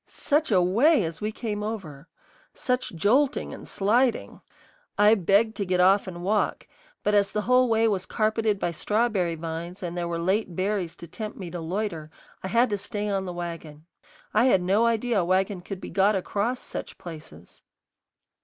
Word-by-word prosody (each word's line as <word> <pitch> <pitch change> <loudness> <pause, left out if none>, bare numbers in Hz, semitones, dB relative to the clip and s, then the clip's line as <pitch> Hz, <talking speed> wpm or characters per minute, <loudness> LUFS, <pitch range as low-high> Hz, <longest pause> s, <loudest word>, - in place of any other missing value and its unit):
Such 300 +1 0
a 185 -3 +4
way 235 - +4
as 165 +2 -5
we 210 +1 -1
came 215 -2 -4
over! 180 -9 -6 0.5
Such 250 -7 -2
jolting 255 - +1
and - - -10
sliding! 235 +5 +1 0.6
I 210 +1 +6
begged 205 +3 +2
to 200 - -1
get 180 0 0
off 190 +2 +4
and 175 -1 -7
walk; 205 +3 0 0.4
but 210 - +1
as 200 -1 +3
the 210 - -1
whole 250 +1 +4
way 225 0 +3
was 195 -4 -1
carpeted 220 -1 0
by 175 - -1
strawberry 200 -1 0
vines 165 +3 -6
and 175 -1 -4
there 175 -1 -2
were 170 0 -2
late 185 +2 -1
berries 185 -2 -1
to 170 - -11
tempt 215 +5 -7
me 180 -4 -7
to 175 -1 -5
loiter, 165 -2 -3 0.3
I - - -4
had 235 +3 +2
to 205 - -1
stay 205 +1 -4
on 195 -1 -1
the 180 - -4
wagon. 165 -3 -7 0.5
I 220 +3 +4
had 195 -8 +4
no 205 +6 +3
idea 230 -1 +1
a - - +1
wagon 185 +1 0
could 190 +1 -7
be - - -8
got 200 +3 +3
across 205 +6 -1
such - - -7
places. 155 - -11
200 Hz, 185 wpm, -26 LUFS, 175-220 Hz, 0.6 s, I